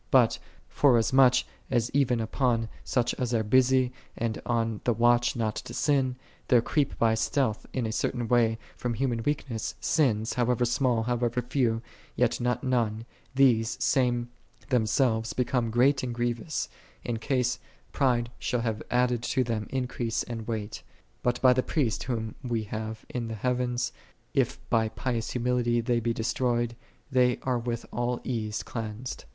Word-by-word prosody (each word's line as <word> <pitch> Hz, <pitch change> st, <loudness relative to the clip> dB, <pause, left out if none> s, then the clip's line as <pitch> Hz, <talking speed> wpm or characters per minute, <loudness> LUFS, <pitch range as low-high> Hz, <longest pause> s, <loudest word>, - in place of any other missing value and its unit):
But, -, -, +4 dB, 0.3 s
forasmuch 130 Hz, -1 st, +5 dB, 0.3 s
as 120 Hz, 0 st, +1 dB
even 130 Hz, -4 st, +2 dB
upon 115 Hz, 0 st, 0 dB
such 125 Hz, -2 st, 0 dB
as 125 Hz, -1 st, 0 dB
are 110 Hz, -, +2 dB
busy 130 Hz, +2 st, +3 dB, 0.2 s
and 115 Hz, -1 st, -2 dB
on 115 Hz, -3 st, 0 dB
the 120 Hz, -, +2 dB
watch 120 Hz, +1 st, +3 dB
not 110 Hz, -3 st, -1 dB
to -, -, -7 dB
sin, 135 Hz, -4 st, +2 dB, 0.3 s
there 125 Hz, -, +6 dB
creep 140 Hz, +4 st, 0 dB
by 115 Hz, -1 st, +3 dB
stealth, 115 Hz, 0 st, 0 dB
in 125 Hz, -3 st, -1 dB
a 110 Hz, -, -2 dB
certain 120 Hz, +1 st, -1 dB
way, 115 Hz, -1 st, +3 dB, 0.2 s
from 120 Hz, -2 st, -3 dB
human 120 Hz, -2 st, 0 dB
weakness, 130 Hz, -4 st, -2 dB
sins, 110 Hz, -, +1 dB
however 125 Hz, 0 st, +1 dB
small, 120 Hz, -2 st, +1 dB
however 120 Hz, 0 st, 0 dB
few, 120 Hz, -3 st, 0 dB, 0.3 s
yet -, -, +1 dB
not 125 Hz, 0 st, 0 dB
none; 115 Hz, -4 st, 0 dB, 0.3 s
these 120 Hz, -4 st, +3 dB
same 120 Hz, -2 st, +1 dB, 0.4 s
themselves 115 Hz, -1 st, +2 dB
become 125 Hz, -2 st, 0 dB
great 130 Hz, +4 st, +3 dB
and 125 Hz, -2 st, -3 dB
grievous, 120 Hz, +5 st, -2 dB, 0.4 s
in 120 Hz, -2 st, -2 dB
case 125 Hz, 0 st, 0 dB, 0.3 s
pride 120 Hz, -4 st, +1 dB
shall 125 Hz, -, -1 dB
have 110 Hz, -2 st, -2 dB
added 125 Hz, -1 st, +2 dB
to 130 Hz, +2 st, +1 dB
them 115 Hz, -3 st, -2 dB
increase 125 Hz, -3 st, -2 dB
and 115 Hz, -2 st, -6 dB
weight: 110 Hz, -2 st, -4 dB, 0.4 s
but 120 Hz, 0 st, 0 dB
by 130 Hz, -1 st, +7 dB
the 130 Hz, -, +2 dB
Priest, 125 Hz, -5 st, -1 dB
Whom 115 Hz, -3 st, -3 dB
we 120 Hz, -3 st, -1 dB
have 110 Hz, +1 st, -5 dB
in 120 Hz, -2 st, -4 dB
the 115 Hz, -, -4 dB
heavens, 125 Hz, +1 st, -1 dB, 0.4 s
if -, -, +1 dB
by 110 Hz, -1 st, +3 dB
pious 115 Hz, 0 st, -2 dB
humility 120 Hz, -1 st, +1 dB
they 120 Hz, +1 st, +1 dB
be 115 Hz, 0 st, 0 dB
destroyed, 120 Hz, 0 st, 0 dB, 0.4 s
they 125 Hz, -2 st, +3 dB
are 125 Hz, -2 st, 0 dB
with 120 Hz, 0 st, -3 dB
all 120 Hz, 0 st, -1 dB
ease 110 Hz, -4 st, -2 dB
cleansed. 115 Hz, -, -6 dB
120 Hz, 155 wpm, -28 LUFS, 115-125 Hz, 0.4 s, by